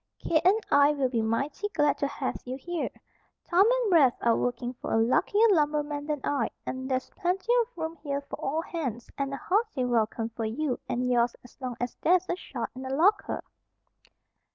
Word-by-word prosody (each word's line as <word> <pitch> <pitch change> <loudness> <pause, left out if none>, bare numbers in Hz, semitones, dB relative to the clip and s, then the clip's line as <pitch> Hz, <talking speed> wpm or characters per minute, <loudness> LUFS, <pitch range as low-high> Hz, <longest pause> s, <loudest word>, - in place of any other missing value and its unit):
Kate 315 -2 +1
and 385 +5 +5
I 285 +1 +6
will 275 -3 0
be 235 -3 0
mighty 275 - -1
glad 295 -2 +2
to 280 - +1
have 280 -1 -3
you 255 +1 -5
here. 345 +4 -3 0.6
Tom 370 +4 +5
and - - +1
Rafe 275 -7 +6
are 235 -1 +3
working 245 0 -2
for - - -4
a - - +3
luckier 330 - +3
lumberman 295 -3 +1
than 300 -3 -2
I, 275 -6 0 0.2
and 260 +1 -4
there's 260 -1 -1
plenty 380 +6 0
of 470 -2 -7
room 320 0 -3
here 280 -1 -3
for 280 - -8
all 310 +4 0
hands, 255 -11 -5
and 275 -1 -2
a 275 - -3
hearty 400 - 0
welcome 225 -1 0
for 230 0 -4
you 255 +4 -2
and 250 +1 0
yours 240 -1 +2
as 245 - -16
long 250 -2 -4
as 245 -1 -3
there's 365 +2 +3
a - - +1
shot 250 -9 -6
in 255 - -8
the 260 - -5
locker." 345 +10 +2
280 Hz, 200 wpm, -28 LUFS, 245-335 Hz, 0.6 s, I